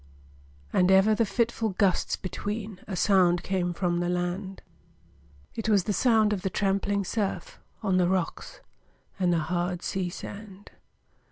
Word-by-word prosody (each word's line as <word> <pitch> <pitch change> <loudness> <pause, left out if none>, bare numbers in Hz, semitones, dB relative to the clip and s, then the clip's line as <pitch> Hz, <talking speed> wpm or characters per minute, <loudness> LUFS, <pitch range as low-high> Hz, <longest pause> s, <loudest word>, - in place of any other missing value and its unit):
And 180 0 +3
ever 190 +3 +5
the 215 +1 +1
fitful 230 0 0
gusts 195 -4 +2
between 205 +1 -5
A 195 - -4
sound 180 -2 +3
came 185 -2 -1
from 175 -1 -1
the 175 0 -1
land; 180 +2 -3 0.9
It 225 -1 -3
was 200 -4 +4
the 205 - -1
sound 220 -1 +3
of 195 - -3
the 190 - -1
trampling 200 +1 0
surf, 220 - -3 0.2
On 190 -3 +2
the 180 -1 +3
rocks 185 -3 -3 0.6
and 180 -2 +2
the 170 - +2
hard 175 +2 -2
sea 185 -2 -2
sand. 200 +2 -9
190 Hz, 150 wpm, -27 LUFS, 180-210 Hz, 0.9 s, ever